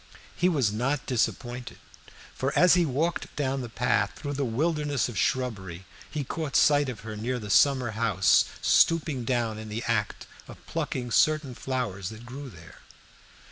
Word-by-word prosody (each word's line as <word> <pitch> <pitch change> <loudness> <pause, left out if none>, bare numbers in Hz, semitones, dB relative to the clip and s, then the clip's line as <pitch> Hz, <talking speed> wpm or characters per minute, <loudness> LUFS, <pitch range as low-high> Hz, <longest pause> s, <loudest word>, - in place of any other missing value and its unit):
He 180 - +2
was 135 - +1
not 125 +5 -1
disappointed, 125 0 -2 0.6
for 135 +2 -2
as 180 -1 +6
he 175 -2 +3
walked 155 +6 -2
down 135 -2 -1
the 120 - -6
path 110 -3 0
through 145 -1 -5
the 140 0 -1
wilderness 145 +3 0
of 120 - -7
shrubbery 95 -5 -2 0.2
he 150 -2 -3
caught 145 0 -4
sight 145 -2 +4
of 120 - -7
her 110 0 -7
near 120 +4 -2
the 105 -4 -5
summer 130 -3 +4
house, 105 -5 +3 0.2
stooping 155 -7 +3
down 115 -3 -1
in 110 0 -8
the 110 +3 -4
act 105 -3 -1 0.2
of - - -13
plucking 125 -2 -3
certain 155 -1 +2
flowers 115 -8 -3
that 110 +2 -11
grew 135 +3 -8
there. 85 -3 -14
125 Hz, 165 wpm, -27 LUFS, 110-145 Hz, 0.6 s, as